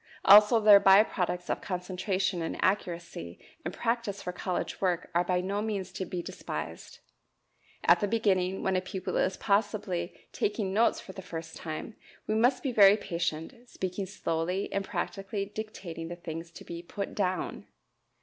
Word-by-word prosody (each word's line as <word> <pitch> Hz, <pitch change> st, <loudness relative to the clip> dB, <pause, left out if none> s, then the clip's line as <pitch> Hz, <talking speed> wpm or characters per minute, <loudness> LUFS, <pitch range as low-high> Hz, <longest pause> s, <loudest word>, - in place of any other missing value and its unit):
Also 210 Hz, +3 st, +8 dB
their 210 Hz, -2 st, +8 dB
by 195 Hz, +1 st, +7 dB
products 180 Hz, -4 st, -2 dB
of -, -, -2 dB
concentration 185 Hz, 0 st, -2 dB
and 165 Hz, -, -3 dB
accuracy 175 Hz, -, -2 dB, 0.3 s
and 175 Hz, -, -3 dB
practice 230 Hz, -3 st, -2 dB
for 180 Hz, -, -5 dB
college 180 Hz, 0 st, -3 dB
work 180 Hz, -2 st, 0 dB
are 175 Hz, +1 st, +3 dB
by 180 Hz, 0 st, 0 dB
no 200 Hz, +3 st, -2 dB
means 200 Hz, -4 st, -3 dB
to 190 Hz, 0 st, -4 dB
be 175 Hz, -1 st, -4 dB
despised. 80 Hz, -, -6 dB, 0.9 s
At 170 Hz, +1 st, +6 dB
the 205 Hz, -, 0 dB
beginning, 195 Hz, -4 st, +1 dB
when 190 Hz, -, +1 dB
a 185 Hz, -, +2 dB
pupil 185 Hz, 0 st, -5 dB
is 190 Hz, 0 st, +1 dB
possibly 200 Hz, -4 st, -1 dB
taking 205 Hz, -2 st, -1 dB
notes 225 Hz, +3 st, +3 dB
for -, -, -10 dB
the 190 Hz, -, -8 dB
first 165 Hz, -3 st, -7 dB
time, 165 Hz, +5 st, -6 dB, 0.3 s
we 215 Hz, -, -1 dB
must 245 Hz, +4 st, +3 dB
be 270 Hz, -, 0 dB
very 205 Hz, -3 st, +7 dB
patient, 170 Hz, -1 st, -3 dB, 0.2 s
speaking 185 Hz, +1 st, -4 dB
slowly 180 Hz, -1 st, -2 dB
and 200 Hz, -, 0 dB
practically 195 Hz, +1 st, -3 dB
dictating 200 Hz, -6 st, -7 dB
the 175 Hz, -, -6 dB
things 165 Hz, -1 st, -7 dB
to -, -, -10 dB
be 170 Hz, 0 st, -6 dB
"put 200 Hz, +3 st, -5 dB
down." 185 Hz, -2 st, -2 dB
190 Hz, 165 wpm, -29 LUFS, 175-205 Hz, 0.9 s, Also